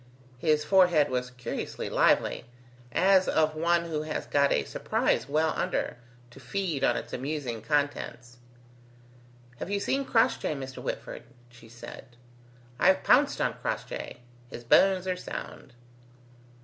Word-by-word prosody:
His 150 +1 +2
forehead 175 -7 +4
was 125 0 -2
curiously 125 -1 -5
lively, - - +2 0.5
as 190 +6 +4
of 155 -1 +2
one 170 +2 +1
who 155 -2 -3
has 155 0 -4
got 140 -1 +2
a - - +2
surprise 125 - -1
well 155 +2 +1
under, - - -2 0.3
to 135 - -14
feed 155 +2 -3
on - - +3
its - - -7
amusing 130 -4 -4
contents. 125 -2 -2 1.2
"Have - - -6
you 200 0 0
seen 270 +7 0
Crossjay, 225 - +1
Mr. 135 -1 -7
Whitford?" - - -5 0.3
she 120 -1 -16
said. 120 +1 -11 0.6
"I've 190 +1 +4
pounced 280 +3 +4
on - - +1
Crossjay; - - -5 0.3
his 120 - -9
bones 190 +9 +4
are 185 -1 -1
sound." 155 -7 -8
155 Hz, 135 wpm, -28 LUFS, 125-185 Hz, 1.2 s, forehead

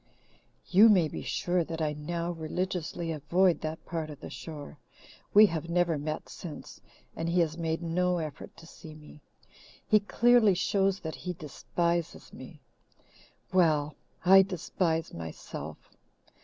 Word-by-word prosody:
"You 205 +5 +8
may 180 -6 +5
be - - -6
sure 175 0 0
that 165 0 -6
I 155 -2 0
now 170 +3 -3
religiously 170 0 -3
avoid 170 +4 +2
that 155 +1 -5
part 165 -3 -4
of 150 - -9
the - - -9
shore. 150 -2 -9 0.5
We 210 +1 +8
have 165 -4 -3
never 175 -1 +2
met 155 +2 -4
since, 170 -5 -9 0.3
and 165 +1 -3
he 175 +1 +2
has 160 -2 0
made 165 0 -2
no 180 +2 +1
effort 155 -4 -7
to 165 - -13
see 160 -1 -12
me. 150 0 -15 0.7
He 215 - +5
clearly 225 0 +4
shows 195 +1 +1
that 160 -1 -5
he 180 0 -5
despises 170 +1 -3
me. - - -11 0.9
Well, 155 -5 +3 0.3
I 195 +1 +9
despise 170 -3 -2
myself. 80 -1 -8
170 Hz, 140 wpm, -29 LUFS, 155-180 Hz, 0.9 s, I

